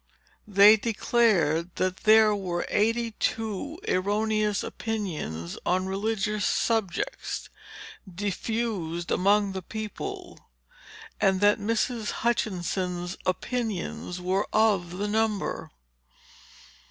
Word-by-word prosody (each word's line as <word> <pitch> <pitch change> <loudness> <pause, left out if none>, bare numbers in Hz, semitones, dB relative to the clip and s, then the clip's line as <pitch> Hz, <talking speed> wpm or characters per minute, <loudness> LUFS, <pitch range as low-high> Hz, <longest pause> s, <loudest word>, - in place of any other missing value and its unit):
They 205 +1 +7
declared 200 -7 +1
that 185 0 -1
there 215 -1 +5
were 180 -3 -2
eighty 230 +2 +1
two 225 - -2
erroneous 210 +2 +1
opinions 155 - -4
on 185 +1 +1
religious 210 +1 -1
subjects, 225 - -1 0.6
diffused 195 -3 -3
among 200 +1 +3
the 190 0 -4
people, 225 - -6 0.8
and 190 -1 +3
that 205 +1 +4
Mrs. 225 +1 -1 0.2
Hutchinson's 180 -5 -1
opinions 200 -3 -2
were 185 +3 0
of 195 -5 +2
the 205 +2 -1
number." 215 -1 -1
205 Hz, 90 wpm, -27 LUFS, 185-220 Hz, 0.8 s, They